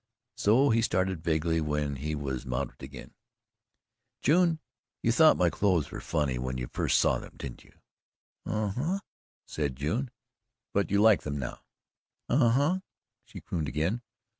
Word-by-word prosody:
So 130 +7 +4
he 115 +1 +3
started 95 -5 0
vaguely 80 0 +1
when 75 -2 -1
he 75 +3 -3
was 65 -3 -3
mounted 65 -1 -4
again: - - -10 1.1
"June, 165 +2 +4 0.4
you 115 - +3
thought 155 +6 +6
my 90 -2 +3
clothes 90 -7 +1
were - - -6
funny 75 -6 -1
when 65 0 -3
you 60 - -3
first - - +2
saw - - +3
them - - -12
didn't 65 -3 -8
you?" - - -21 0.7
"Uh, 110 -1 -1
huh!" 155 - -1 0.5
said 70 -4 -3
June. 85 - -1 0.6
"But 100 -1 +1
you 100 +1 +3
like 110 -2 +6
them 75 -1 -4
now?" 65 -3 -5 0.7
"Uh, 120 - +4
huh!" 145 +10 +2 0.5
she - - -10
crooned 80 -4 -3
again. 80 - -1
85 Hz, 155 wpm, -29 LUFS, 75-115 Hz, 1.1 s, thought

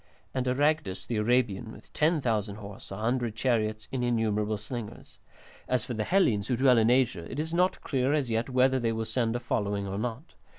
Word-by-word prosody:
And 130 -1 -1
Aragdus 140 -6 +1
the 115 - -2
Arabian 110 -1 +1
with - - -15
10,000 120 - +1
horse, 100 -1 -10
a 95 - -6
hundred 115 +1 -1
chariots, 110 -3 0
and 130 -2 -1
innumerable 110 -3 0
slingers. 105 +1 -8 0.5
As 125 -2 0
for 125 - -4
the 110 -2 -2
Hellenes 115 - +2
who 125 - +1
dwell 130 -2 +5
in 110 +1 +3
Asia, 120 -9 +1
it 130 - -4
is 160 +2 -3
not 180 +2 +2
clear 130 -1 0
as 145 -5 0
yet 115 +3 0
whether 130 +1 +3
they 115 -2 0
will 110 0 -2
send 115 -1 0
a - - 0
following 100 -4 -1
or 95 +1 -3
not. 125 +7 -5
120 Hz, 200 wpm, -28 LUFS, 110-130 Hz, 0.5 s, dwell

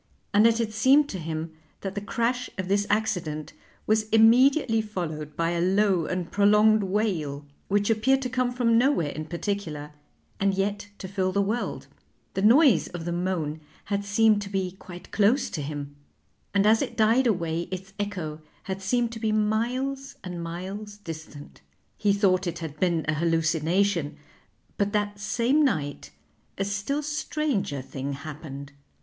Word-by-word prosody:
And 210 +3 +6
it 230 -1 +3
had 225 -2 -1
seemed 265 +6 +5
to 190 - -5
him 160 0 -4 0.3
that 195 -1 -4
the 205 - -4
crash 240 +4 -1
of 190 -1 -3
this 200 +1 +1
accident 175 -8 -1 0.3
was 215 0 +1
immediately 230 +2 +5
followed 155 -8 -5
by 165 0 +1
a 170 0 0
low 190 -2 +2
and 180 -2 -3
prolonged 210 +1 +5
wail, 185 -8 -1 0.2
which 205 +2 +2
appeared 265 +5 +2
to - - -1
come 250 0 0
from 235 -2 +3
nowhere 240 - +2
in 155 - -5
particular 170 -5 -4 0.5
and 195 0 +2
yet 200 +1 -1
to 190 - -7
fill 185 -1 -1
the 200 - 0
world; 220 +5 -2 0.5
the 190 - -1
noise 230 - +5
of 175 -2 -7
the 175 - -2
moan 170 -4 -2 0.3
had 200 0 0
seemed 210 +1 +3
to 200 - -6
be 190 -2 -1
quite 180 -1 -12
close 220 +6 +2
to 155 - -3
him, 145 0 -5 0.6
and 200 0 +2
as 220 +1 +5
it - - -4
died 230 +4 +4
away 170 -5 -1
its 190 +1 -7
echo 175 -7 -4 0.2
had 190 0 -5
seemed 235 +4 0
to 230 - -7
be 220 -1 0
miles 245 +6 -1
and 180 -2 -5
miles 195 +5 -6
distant. 160 -6 -10 0.3
He 205 -1 +2
thought 195 -2 +2
it 170 - -3
had 155 -3 -7
been 170 -3 +1
a 155 - +2
hallucination, 165 +1 +1 0.6
but 200 +1 +1
that 205 -1 -1
same 240 +8 +2
night 150 - -1 0.5
a 195 - 0
still 205 +9 -2
stranger 290 - -2
thing 135 +1 -5
happened. 140 -1 -8
200 Hz, 165 wpm, -26 LUFS, 165-220 Hz, 0.6 s, And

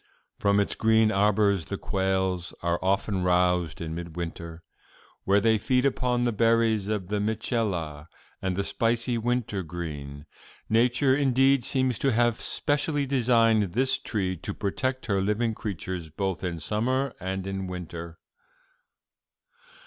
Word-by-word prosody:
From 100 0 +3
its 100 - +1
green 110 0 +3
arbors 100 -3 +2
the - - -3
quails 95 -2 -1
are 85 0 0
often 95 0 0
roused 90 -2 +1
in 80 -1 -4
midwinter, 85 0 -6 0.6
where 100 +1 +4
they 110 +1 +3
feed 125 +4 +1
upon 125 -2 +1
the 120 - +2
berries 115 -2 +2
of 105 -4 -2
the 105 0 0
Mitchella 100 - -2 0.3
and 95 -1 -1
the 100 - -1
spicy 115 +3 0
wintergreen. 85 - -3 0.4
Nature, 125 +4 +3
indeed, 135 -1 +3
seems 130 -3 0
to 135 - +2
have 120 0 +2
specially 145 0 0
designed 115 -7 +3
this 130 +4 +2
tree 95 -4 -2
to - - -5
protect 130 +6 -2
her 100 -2 +1
living 110 +3 0
creatures 95 -5 -5
both 95 +4 -3
in 90 -2 -2
summer 125 - -1
and 95 0 -4
in 95 -1 -4
winter.'" 85 -2 -7
100 Hz, 135 wpm, -26 LUFS, 90-120 Hz, 0.6 s, where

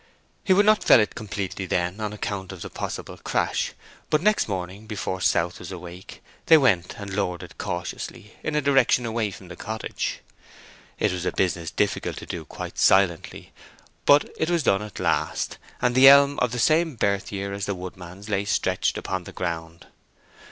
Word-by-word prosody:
He - - 0
would 200 +2 +5
not 215 0 +4
fell - - +7
it 105 - +1
completely 95 -3 -5
then, 90 +3 -1
on 105 -1 -2
account 100 -2 -4
of 95 -3 -8
the - - -8
possible - - -5
crash, - - -1 0.4
but 155 - +3
next 210 +5 +2
morning, 95 +1 -5
before 95 -3 -4
South 85 0 +1
was - - -8
awake, 90 0 -10 0.2
they 160 - +9
went 95 - +2
and 100 -1 -7
lowered 90 -3 -2
it - - -13
cautiously, 90 +4 -5
in 155 - -3
a 150 - +1
direction 135 -3 +3
away 115 -2 -1
from 95 -1 -11
the 90 - -9
cottage. 110 +4 -4 0.8
It - - +1
was 90 -1 -3
a - - 0
business 90 -3 -1
difficult - - -1
to - - -7
do - - -6
quite - - -7
silently; 95 -4 +2 0.5
but 145 +1 +6
it 160 - +1
was 170 -3 +1
done 95 -5 +3
at 105 -2 -8
last, 75 0 -1 0.2
and 125 - +3
the 130 +2 +8
elm 140 +1 +7
of 125 - +1
the 125 - -3
same 155 +4 +3
birth 100 -2 0
year 100 0 -4
as 100 -1 -4
the 100 - -1
woodman's 90 +2 -9
lay 100 -1 -1
stretched - - 0
upon - - -4
the - - -9
ground. 85 -1 -5
100 Hz, 185 wpm, -24 LUFS, 90-125 Hz, 0.8 s, they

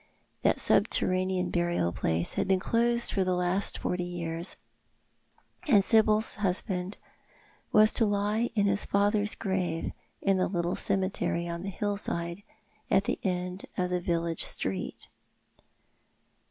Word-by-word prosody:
That - - +2
subterranean 185 -1 +2
burial 175 - 0
place 85 0 -1
had - - -1
been 190 -1 +3
closed 235 +3 +1
for 195 - +2
the 185 -1 0
last 180 +3 0
forty 180 0 -2
years, 170 -1 -3 1.1
and 210 -8 +5
Sibyl's 220 +1 +3
husband 185 0 -2 0.7
was 215 0 +6
to 225 - +3
lie 205 +3 0
in 205 -2 +3
his 200 0 +1
father's 205 +1 +1
grave 185 -5 -2 0.3
in 195 -1 +2
the 185 - +1
little 175 -1 -1
cemetery 185 -3 -1
on 170 0 -4
tho 195 - -4
hillside, 195 -3 -3 0.5
at 195 - +4
tho - - -1
end 180 0 -3
of 180 -1 0
the 180 -1 0
village 170 -1 -1
street. 95 0 -3
185 Hz, 130 wpm, -29 LUFS, 175-205 Hz, 1.1 s, was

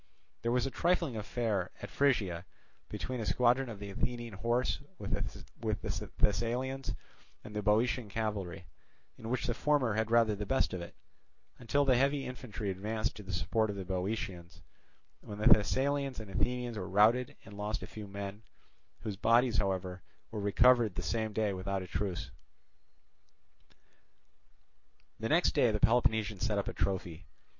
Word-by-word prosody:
There 115 - 0
was 125 +1 +2
a 135 - -2
trifling 170 -6 +1
affair 105 -3 -1
at 100 - -7
Phrygia 100 -12 +2 0.5
between 130 -1 -4
a 110 - -2
squadron 125 +6 +3
of 110 - -6
the 100 0 -7
Athenian 120 +2 -3
horse 120 +5 0 0.2
with - - -6
the - - -4
Thessalians 125 +5 0 0.5
and 105 - -10
the 105 - 0
Boeotian 110 +2 +2
cavalry; 100 -5 -3 0.5
in 110 - -6
which 130 +1 0
the 120 - 0
former 135 -3 +2
had 110 +1 0
rather 115 -2 +4
the 100 0 -5
best 135 - +1
of 90 - -3
it, 85 - -9 0.6
until 140 +4 +2
the 130 -2 +5
heavy 140 +1 +2
infantry 115 -5 -4
advanced 110 +4 -2
to - - -8
the 100 -1 -7
support 105 +6 +1
of 100 - -3
the 95 -1 -5
Boeotians, 90 -2 -4 0.6
when 105 - -8
the 105 - -3
Thessalians 135 +6 +4
and 105 -3 -8
Athenians 120 0 -1
were 90 - -5
routed 110 +6 +4
and 100 - -11
lost 105 +1 -3
a - - -4
few 105 -2 -8
men, 100 +1 -6 0.6
whose 105 -3 -4
bodies, 115 +2 +4
however, 95 -2 -1 0.3
were 110 -2 -3
recovered 115 0 +4
the - - -3
same 110 -1 -1
day 105 -1 0
without 95 +1 -2
a - - -8
truce. 90 0 -3 2.9
The 110 - -2
next 170 +3 +4
day 135 -5 +4
the 105 -1 0
Peloponnesians 110 -3 +2
set 110 -2 +1
up 100 - -1
a - - -3
trophy. 90 -3 -2
110 Hz, 160 wpm, -32 LUFS, 100-125 Hz, 2.9 s, the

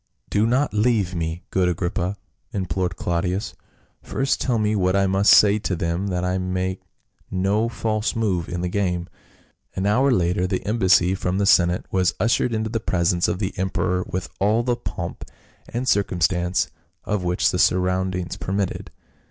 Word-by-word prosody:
" - - -38
Do 105 +2 +2
not 130 +3 +1
leave 105 -4 +1
me, 85 0 -3
good 90 -1 +2
Agrippa," 90 +2 -2 0.3
implored 95 -2 -2
Clau 85 -1 -1
dius, 95 +3 -2 0.2
" - - -35 0.2
first 135 +1 -1
tell 125 -3 +1
me 105 0 +1
what 95 -1 +1
I 100 0 +3
must 95 +2 +4
say 105 0 +6
to 95 - -2
them, 85 +4 -2
that 90 -2 -2
I 90 +1 0
make 95 0 -2 0.5
no 100 +5 +1
false 110 -1 -1
move 95 -7 -1
in 85 0 -3
the 90 - -1
game." 90 -2 -1 0.7
An 95 - -1
hour 125 +7 +3
later 90 -5 +1
the 95 -1 -3
embassy 95 -4 +3
from 90 -1 -2
the 100 - +1
senate 90 -2 +3
was 95 -2 +1
ushered 120 +3 +2
into 110 -1 -2
the 115 - -1
presence 85 -4 +1
of - - -1
the 95 -1 -3
emperor 90 -1 0
with 90 0 -3
all 110 +4 +2
the 120 0 +1
pomp - - -6 0.5
and 125 +2 -3
circumstance 90 -3 +1 0.3
of 105 -3 -2
which 90 0 +1
the - - -2
surroundings 90 -1 +1
permitted. 95 0 -3
95 Hz, 175 wpm, -23 LUFS, 90-105 Hz, 0.7 s, say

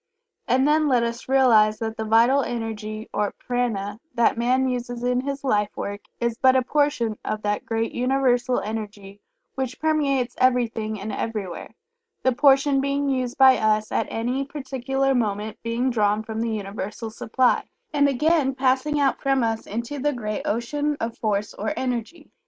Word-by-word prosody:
And 260 +3 +3
then 305 0 +3
let 250 -4 +3
us 235 +2 -4
realize 225 -6 +5
that 225 -1 -4
the 220 - -3
vital 230 +5 +4
energy 220 -3 -4
or 210 -1 -1
Prana 225 -5 -2 0.2
that 235 -2 +3
man 255 +3 +2
uses 245 -1 -3
in 250 0 +1
his 275 +1 -4
life 210 -6 +1
work 205 0 -4 0.2
is 235 0 -1
but 260 0 +5
a 260 - +3
portion 260 -6 0
of 215 0 -3
that 205 0 -2
great 225 0 -1
universal 250 -1 +1
energy 205 -2 -6 0.3
which 260 -2 -4
permeates 280 -6 +1
everything 230 -4 +1
and 210 +3 -5
everywhere, 200 -7 -5 0.5
the 260 - +4
portion 275 +1 +4
being 280 +1 0
used 255 -2 -1
by 265 -1 +7
us 215 0 +1
at - - 0
any 245 +4 -1
particular 270 -1 -2
moment 215 -3 -2
being 235 +3 -1
drawn 210 -2 +1
from 220 0 -4
the 230 - -1
universal 210 +1 -5
supply, 245 +3 +1 0.2
and 285 -1 +4
again 280 0 +2
passing 265 +3 +1
out 275 -2 +1
from 270 -2 +2
us 225 -1 -2
into 235 +7 -4
the 295 +2 0
great 215 -4 -3
ocean 290 +6 -1
of 230 0 -3
force 210 -2 -1
or 310 - -4
energy. 255 +5 -4
245 Hz, 165 wpm, -24 LUFS, 220-270 Hz, 0.5 s, by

